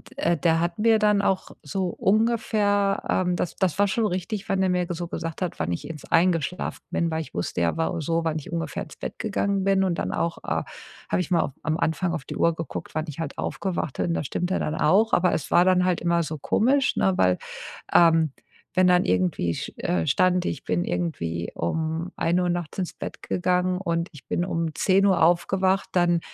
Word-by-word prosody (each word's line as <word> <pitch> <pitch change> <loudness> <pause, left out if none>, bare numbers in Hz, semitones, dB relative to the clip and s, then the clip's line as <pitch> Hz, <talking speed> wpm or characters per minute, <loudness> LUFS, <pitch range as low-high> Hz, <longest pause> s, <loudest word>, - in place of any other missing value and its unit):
d 225 -12 +1
der 165 0 +2
hat 170 +3 -2
mir 225 0 +5
dann 210 -1 +3
auch 190 -1 0
so 185 +5 -2
ungefähr 205 -1 +1
ähm, 180 -1 +1
das 175 - -2
das 185 -2 0
war 205 - +5
schon 225 +3 0
richtig, 195 +3 -3
wann 190 -1 +2
er 185 - +2
mir 180 -1 +1
so 175 0 -3
gesagt 165 0 -5
hat, 180 -3 -3
wann 85 +2 -1
ich 145 - -6
ins 155 -3 -8
eingeschlafen 170 0 +1
bin, 170 -1 0
weil 160 - -1
ich - - -10
wusste 85 - -2
ja, 85 - +1
war 165 +1 -1
so 165 +2 0
wann 160 -1 -1
ich - - -11
ungefähr 165 0 -3
ins - - -13
Bett - - -6
gegangen 200 -3 0
bin, 195 -1 +3
und 180 -3 +1
dann - - -2
auch, 165 0 -1
äh, - - -1 0.5
habe - - +1
ich 180 - -6
mal 170 - +4
auf 140 - -2
am 160 0 0
Anfang 170 +2 0
auf 150 -5 -4
die - - -6
Uhr 170 -1 +2
geguckt, 165 -1 -6
wann 155 +1 -1
ich 150 +1 -8
halt 160 -4 -4
aufgewacht 175 -8 -3
bin, 170 - 0
das - - -2
stimmte 180 +2 -1
dann 150 - -2
auch, 205 +9 +3
aber 180 0 +3
es 145 - -3
war 175 +1 +5
dann 180 -1 +4
halt 180 -2 +1
immer 170 0 +2
so 155 0 -5
komisch, 260 - +2
ne? 190 - +2
Weil, 90 0 +3 0.6
ähm, 165 -3 +5 0.4
wenn 185 -1 +4
dann 180 0 +4
irgendwie 90 -2 +1
sch - - -5
äh, 85 -2 0
stand, 180 -1 +2
ich - - -3
bin 175 - 0
irgendwie 85 - -2
um 160 - -2
1:00 180 +1 +1
nachts 175 -1 -4
ins 180 -2 -2
Bett - - -7
gegangen 180 0 0
und 170 -2 -1
ich 150 - -15
bin 175 - 0
um 165 -3 -2
10:00 190 -3 +4
aufgewacht, 190 +3 +2
dann 175 -2 +3
175 Hz, 215 wpm, -25 LUFS, 160-190 Hz, 0.6 s, mir